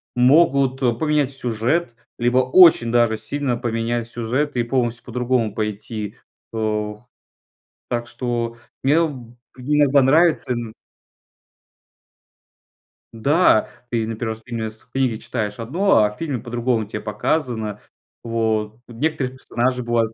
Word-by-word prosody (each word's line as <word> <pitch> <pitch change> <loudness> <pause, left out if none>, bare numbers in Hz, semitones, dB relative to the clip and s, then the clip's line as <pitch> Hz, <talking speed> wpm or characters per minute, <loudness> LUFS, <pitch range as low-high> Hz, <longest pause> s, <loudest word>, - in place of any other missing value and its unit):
могут 135 0 +4 0.2
поменять 150 -3 +1
сюжет, 125 +3 -1 0.2
либо 120 +1 +3
очень 130 -2 +6
даже 120 -2 +3
сильно 125 +3 -2
поменять 115 -1 -2
сюжет 125 +5 -2
и 120 - +2
полностью 120 -1 -1
по-другому 125 -2 0
пойти, 105 0 -4 0.4
о 105 0 -2 0.8
Так 120 -1 -2
что 120 -1 -3 0.2
мне 150 +5 +4
б 125 -6 -9 0.2
иногда 145 +1 +3
нравится 155 +1 +3
ин 120 -2 -4 2.4
Да! 140 +1 +3 0.2
Ты 115 -2 0
именно 110 +1 -3
1 110 -1 -2
раз 110 - -17
именно 115 -3 -3
с 110 0 -15
книге 125 -2 -1
читаешь 110 -2 -4
одно, 150 - +3
а 105 - +1
в 105 - -15
фильме 145 -7 -3
по-другому 120 -1 -1
те 105 +1 -5
показано. 110 0 -2 0.4
Вот. 110 -1 -1
Некоторые 130 +1 -2
персонажи 125 0 -1
бывают. 115 -1 0
120 Hz, 120 wpm, -21 LUFS, 110-135 Hz, 2.4 s, очень